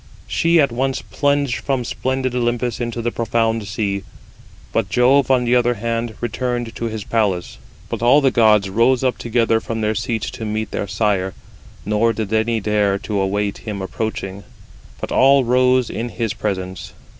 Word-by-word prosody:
She 165 0 +2
at 140 -4 +3
once 130 +2 -1
plunged 140 -3 0
from 130 -3 -2
splendid 130 0 -2
Olympus 120 -1 -1
into 120 -1 -3
the 120 - 0
profound 115 -2 0
sea. 100 0 -2 0.7
But 110 -4 0
Jove 130 +6 +4
on 125 -2 +3
the 120 +1 +3
other 120 0 +3
hand 115 +1 -3
[returned] 120 -1 -3
to 115 - -3
his 110 -2 -4
palace. 100 -6 -1 0.3
But - - -4
all 125 +5 +6
the 135 -2 +3
gods 105 -4 +4
rose 120 +6 +2
up 130 -1 0
together 115 -1 +1
from 115 0 -4
their 105 0 +1
seats 115 0 -2
to - - -7
meet 110 0 -3
their 100 - -3
sire; 95 -1 0 0.5
nor 110 +2 +2
did 110 -1 -4
any 110 +1 +1
dare 105 -1 +1
to 100 0 -3
await 100 +1 -1
59 - - -19
him 100 - -5
approaching, 100 -1 -4 0.6
but - - -5
all 135 +1 +5
rose 125 0 +3
in 120 +2 -4
his 115 -2 -2
presence. 95 -3 -4
115 Hz, 175 wpm, -20 LUFS, 105-125 Hz, 0.7 s, all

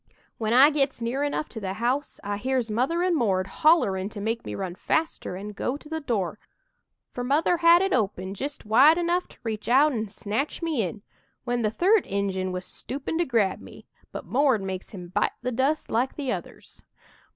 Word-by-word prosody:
"When 220 -1 -1
I 270 +5 +7
gits 275 -3 0
near 240 +4 -2
enough 290 +1 -1
to 225 - -7
the 190 -2 -3
house, 250 +6 -1
I 205 0 -2
hears 250 0 -1
Mother 270 +11 +1
and 360 -1 +2
'Mord' 195 -9 +1 0.2
hollerin' 205 - +4
to 215 - -8
make 225 +3 -2
me - - -5
run 190 -3 -4
faster 315 - -2
and 205 +2 -7
go 250 +7 -2
to 300 - -15
the 320 +1 -3
door, 210 - -2 0.7
for 245 - -4
Mother 300 +7 +2
had 340 +2 +6
it 385 - 0
open 195 -5 -1
jist 280 +7 -6
wide 270 +10 +6
enough 350 +1 0
to - - -18
reach 220 -2 -4
out 280 +5 +5
an' 220 -4 -2
snatch 220 - -3
me 315 -7 0
in 200 +2 -4 0.4
when 245 -1 -1
the 215 - +2
third 375 - +3
Injun 190 -2 -1
was 180 0 -5
stoopin' 285 +5 -5
to 345 - +2
grab 220 - +1
me, - - -13 0.3
but - - -7
'Mord' 260 -6 +2
makes 190 -1 -5
him 180 -4 -9
bite - - 0
the 250 - -1
dust 270 +6 0
like 245 +4 0
the 275 -4 -2
others. - - -8
245 Hz, 200 wpm, -26 LUFS, 205-295 Hz, 0.7 s, I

